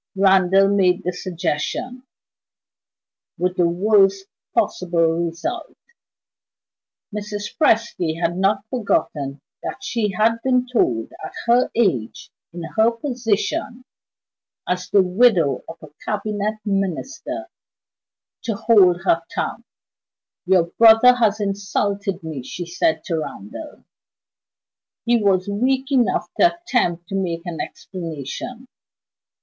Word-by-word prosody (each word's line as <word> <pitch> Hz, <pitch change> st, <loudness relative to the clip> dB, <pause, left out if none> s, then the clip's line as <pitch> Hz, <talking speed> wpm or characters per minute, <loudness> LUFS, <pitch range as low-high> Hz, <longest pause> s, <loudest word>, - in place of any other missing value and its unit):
Randal 195 Hz, 0 st, +4 dB
made 195 Hz, -1 st, +2 dB
the 180 Hz, -, -2 dB
suggestion 180 Hz, +8 st, -3 dB, 1.4 s
with 180 Hz, 0 st, -1 dB
the 175 Hz, -2 st, +3 dB
worst 195 Hz, +1 st, +3 dB, 0.3 s
possible 170 Hz, -1 st, +1 dB
result. 330 Hz, -, -5 dB, 1.4 s
Mrs. 210 Hz, 0 st, -5 dB
Presty 220 Hz, -, +1 dB
had 170 Hz, 0 st, 0 dB
not 195 Hz, +2 st, +1 dB
forgotten 145 Hz, -, -1 dB, 0.2 s
that 260 Hz, -, -6 dB
she 230 Hz, -4 st, -1 dB
had 225 Hz, +4 st, +1 dB
been 255 Hz, -1 st, +2 dB
told 125 Hz, -, 0 dB
at -, -, -7 dB
her 240 Hz, +2 st, +3 dB
age, 180 Hz, -, 0 dB, 0.2 s
in 175 Hz, 0 st, -7 dB
her 220 Hz, +1 st, +5 dB
position 245 Hz, -, -2 dB, 0.8 s
as 180 Hz, +1 st, -2 dB
the 200 Hz, -2 st, +5 dB
widow 180 Hz, -, +3 dB
of 165 Hz, -, -8 dB
a 155 Hz, -, -11 dB
Cabinet 210 Hz, 0 st, -2 dB
Minister 265 Hz, -, -3 dB, 1.0 s
to 225 Hz, -, -2 dB
hold 185 Hz, -6 st, +4 dB
her 165 Hz, -3 st, +2 dB
tongue. -, -, -3 dB, 0.8 s
"Your 185 Hz, -2 st, +5 dB
brother 225 Hz, +7 st, +6 dB
has 220 Hz, -4 st, +1 dB
insulted 200 Hz, -1 st, -2 dB
me," 155 Hz, -4 st, -5 dB
she 175 Hz, +7 st, -6 dB
said 180 Hz, -, 0 dB
to 165 Hz, -6 st, -2 dB
Randal. 290 Hz, -, -8 dB, 1.2 s
He 235 Hz, -1 st, +3 dB
was 190 Hz, -2 st, +2 dB
weak 260 Hz, +6 st, 0 dB
enough 250 Hz, -4 st, +2 dB
to 345 Hz, 0 st, +4 dB
attempt 210 Hz, -, -1 dB
to 195 Hz, -, -3 dB
make 175 Hz, -3 st, -2 dB
an 170 Hz, -2 st, -4 dB
explanation. 180 Hz, -, -7 dB
200 Hz, 110 wpm, -21 LUFS, 175-235 Hz, 1.4 s, brother